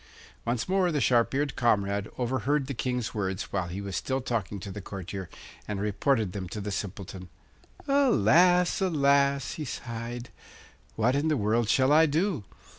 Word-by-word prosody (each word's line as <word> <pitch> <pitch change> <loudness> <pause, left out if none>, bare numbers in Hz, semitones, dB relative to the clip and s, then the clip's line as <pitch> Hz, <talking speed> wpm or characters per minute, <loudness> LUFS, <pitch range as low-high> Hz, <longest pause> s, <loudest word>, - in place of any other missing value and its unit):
Once 120 0 -1
more 185 -1 +2
the 150 - 0
sharp 120 -2 +3
eared 140 0 0
comrade 100 -4 +1
overheard 130 +3 0
the 140 - -4
King's 125 -1 -2
words 95 -2 -3
while 95 -3 -1
he 90 +3 -5
was 100 -2 -5
still 130 0 -1
talking 110 -6 -3
to 100 +2 -7
the 105 - -6
courtier, 95 -1 -6 0.4
and 105 -2 -3
reported 105 +1 +1
them 95 -2 -5
to 105 - -5
the 105 0 -4
Simpleton. 95 -2 -6 0.6
'Alas, 180 - +4
alas!' 140 -5 +2
he 155 - -5
sighed; 120 -1 -6 0.6
'what 120 +4 +2
in 145 +3 +1
the 155 -2 +2
world 110 +1 +1
shall 130 +3 +4
I 160 +1 +6
do? 160 - 0
120 Hz, 165 wpm, -28 LUFS, 100-140 Hz, 0.6 s, I